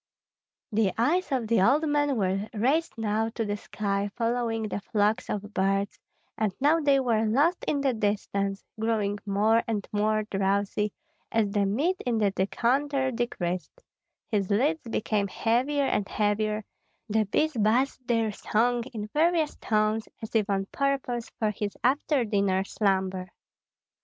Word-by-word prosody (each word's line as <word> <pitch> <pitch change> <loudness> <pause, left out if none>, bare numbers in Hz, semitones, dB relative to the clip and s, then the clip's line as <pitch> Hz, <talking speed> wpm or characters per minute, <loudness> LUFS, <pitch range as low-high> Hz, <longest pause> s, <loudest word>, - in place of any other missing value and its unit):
The 210 -3 +2
eyes 310 +10 +1
of 250 -5 0
the 230 -2 +3
old 285 +10 +4
man 290 -2 +1
were 195 +1 0
raised 275 +10 +1
now 220 0 0
to 225 - -1
the 205 0 -1
sky, 200 -1 -2
following 230 -1 0
the 210 -1 -3
flocks 210 +2 0
of 205 0 -4
birds, 195 +1 0 0.4
and 215 -4 0
now 300 +4 +4
they 285 -3 +3
were 230 -4 +1
lost 285 +11 +2
in 285 - 0
the 270 -2 +2
distance, 200 -2 -1 0.2
growing 215 -2 0
more 215 +3 +3
and 210 -4 -2
more 215 +1 +1
drowsy, 200 +1 0 0.4
as 220 -3 +1
the 200 -1 +2
mead 300 - +1
in 240 -2 0
the 205 -2 +2
decanter 260 +8 0
decreased; 225 - -3 0.4
his 200 -4 -1
lids 285 +10 +2
became 210 -2 0
heavier 255 +8 +1
and 200 -6 0
heavier, 215 0 0 0.4
the 220 0 +1
bees 310 +10 +1
buzzed 245 +3 +1
their 230 -2 +1
song 235 +4 +1
in 210 -1 -3
various 320 0 +2
tones 215 0 0
as 220 -2 -8
if 215 -2 +2
on 195 -1 0
purpose 270 -4 -1
for 215 -2 +1
his 205 0 -4
after 270 0 +2
dinner 200 -3 +1
slumber. 190 -2 0
220 Hz, 150 wpm, -27 LUFS, 205-255 Hz, 0.4 s, old